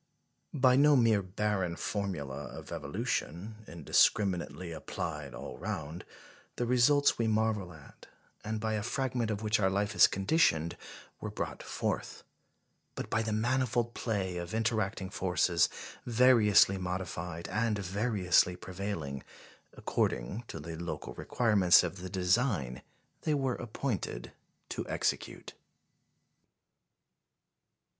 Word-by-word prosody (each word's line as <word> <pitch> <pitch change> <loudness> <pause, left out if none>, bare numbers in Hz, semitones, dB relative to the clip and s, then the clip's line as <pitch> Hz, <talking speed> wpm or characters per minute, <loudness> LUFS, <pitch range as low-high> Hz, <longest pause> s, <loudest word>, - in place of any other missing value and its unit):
By 130 -2 +5
no 145 +1 +6
mere 115 -5 +4
barren 95 -2 -1
formula 85 -10 -3
of - - -10
evolution, 100 +8 -3
indiscriminately 85 +2 +1
applied 80 - -5
all - - -8
round, 85 -4 -5 0.5
the 120 - -1
results 125 +4 +4
we 115 - +2
marvel 110 -4 0
at, 80 -4 -15 0.4
and 110 0 -3
by 110 0 -1
a 105 - 0
fragment 125 0 -1
of 105 0 -3
which 110 +1 +2
our 95 -2 +3
life 100 +2 0
is - - +7
conditioned, 95 - +2 0.4
were - - -4
brought - - -4
forth; - - -3 0.7
but - - -6
by 110 - +2
the 110 -1 -2
manifold 120 +1 0
play 95 -6 -2
of 85 +4 -5
interacting 110 -4 -1
forces, 90 -2 +2 0.4
variously 115 -5 +5
modified 90 -2 -4
and 110 +2 0
variously 95 -2 +2
prevailing, 90 -8 -5 0.5
according 80 - -1
to - - -7
the 80 +2 -6
local 85 0 -5
requirements 105 -8 +4
of 90 +1 -4
the 95 0 -7
design 90 - 0 0.4
they 155 - +1
were 135 -3 0
appointed 110 - -4 0.4
to - - -3
execute. - - -2
100 Hz, 120 wpm, -31 LUFS, 90-115 Hz, 0.7 s, is